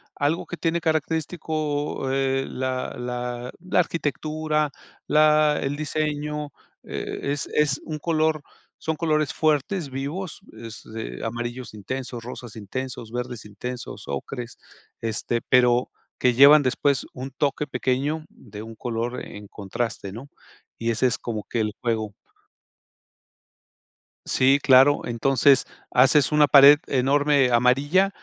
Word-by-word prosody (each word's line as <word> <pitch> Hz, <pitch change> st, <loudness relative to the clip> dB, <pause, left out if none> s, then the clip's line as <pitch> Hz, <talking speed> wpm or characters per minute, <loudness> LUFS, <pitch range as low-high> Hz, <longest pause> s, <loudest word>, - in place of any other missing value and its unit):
algo 145 Hz, +4 st, 0 dB
que 175 Hz, -, -7 dB
tiene 170 Hz, 0 st, 0 dB
característico, 155 Hz, -3 st, -2 dB
eh, 135 Hz, 0 st, 0 dB
la 130 Hz, 0 st, -3 dB
la 125 Hz, 0 st, -4 dB
la 180 Hz, +1 st, 0 dB
arquitectura, 155 Hz, -2 st, -1 dB, 0.4 s
la 150 Hz, 0 st, +4 dB
el 135 Hz, +1 st, -2 dB
diseño, 150 Hz, 0 st, -3 dB, 0.3 s
e 140 Hz, -, -4 dB
es 145 Hz, -, -3 dB
es 150 Hz, -2 st, +2 dB
un 155 Hz, -1 st, -5 dB
color 155 Hz, -1 st, +1 dB, 0.4 s
son 160 Hz, -, -1 dB
colores 155 Hz, -2 st, 0 dB
fuertes, 155 Hz, +2 st, 0 dB
vivos, 145 Hz, +7 st, -5 dB
es, 115 Hz, -1 st, -9 dB
eh, 60 Hz, -, -5 dB
amarillos 120 Hz, +1 st, -5 dB
intensos, 120 Hz, +3 st, -6 dB
rosas 120 Hz, -2 st, -8 dB
intensos, 115 Hz, +2 st, -6 dB
verdes 125 Hz, -1 st, -5 dB
intensos, 120 Hz, +4 st, -7 dB
ocres, 120 Hz, -, -5 dB, 0.4 s
este, 115 Hz, +1 st, -2 dB
pero 125 Hz, -1 st, +3 dB, 0.3 s
que 125 Hz, -1 st, +3 dB
llevan 140 Hz, +4 st, +8 dB
después 135 Hz, +1 st, +1 dB
un 130 Hz, +2 st, -7 dB
toque 145 Hz, +2 st, -1 dB
pequeño 140 Hz, +4 st, -1 dB
de 105 Hz, -, -12 dB
un 110 Hz, 0 st, -10 dB
color 120 Hz, +1 st, -3 dB
en 105 Hz, 0 st, -10 dB
contraste, 100 Hz, 0 st, -4 dB
¿no? 125 Hz, +6 st, -9 dB, 0.5 s
Y 115 Hz, 0 st, -1 dB
ese 115 Hz, +3 st, +2 dB
es 120 Hz, -, -1 dB
como 110 Hz, -3 st, -5 dB
que 120 Hz, -, -3 dB
el 105 Hz, -1 st, 0 dB
juego. 110 Hz, -3 st, -1 dB, 2.1 s
Sí, 135 Hz, +2 st, +4 dB
claro. 135 Hz, +2 st, +5 dB
Entonces, 135 Hz, +3 st, +3 dB, 0.3 s
haces 135 Hz, +3 st, +4 dB
una 150 Hz, -1 st, +5 dB
pared 140 Hz, +1 st, +8 dB
enorme 140 Hz, 0 st, +3 dB
amarilla, 140 Hz, +11 st, +3 dB
135 Hz, 125 wpm, -24 LUFS, 120-150 Hz, 2.1 s, llevan